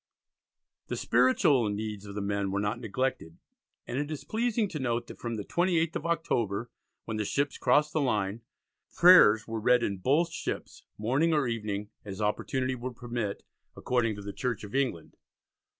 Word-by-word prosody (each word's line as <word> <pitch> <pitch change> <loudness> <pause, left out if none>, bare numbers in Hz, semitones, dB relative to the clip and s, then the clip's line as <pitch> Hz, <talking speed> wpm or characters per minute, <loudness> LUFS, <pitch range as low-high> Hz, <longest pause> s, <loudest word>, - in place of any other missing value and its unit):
The - - -3
spiritual 125 -1 +3
needs 105 0 -4
of 100 - -8
the 105 - -2
men 100 -1 -1
were 100 +1 -1
not 105 +3 -1
neglected, 115 -7 -3 0.5
and 130 - -3
it 145 0 -2
is 150 -3 -5
pleasing 225 +3 0
to 155 - -5
note 120 -2 -1
that - - -11
from 120 -1 -3
the 105 - -4
28th 170 -2 +1
of 160 - -3
October, 120 -10 -1 0.3
when 110 -1 -3
the 105 - 0
ships 140 +7 -1
crossed 150 +4 +3
the 155 - +1
line, 105 -4 0 0.5
"prayers 165 - +7
were 115 0 -3
read 125 +2 +3
in 100 - -1
both 150 - +2
ships, - - -5 0.2
morning 135 +10 +1
or 150 -4 +2
evening, 105 -3 -3
as 100 -2 -7
opportunity 130 +5 -1
would 125 0 -6
permit, 120 -4 -4 0.3
according 120 -4 0
to 100 - -9
the 100 0 -6
Church 125 -6 -3
of 105 - -9
England. 130 - -2
120 Hz, 175 wpm, -29 LUFS, 105-140 Hz, 0.5 s, prayers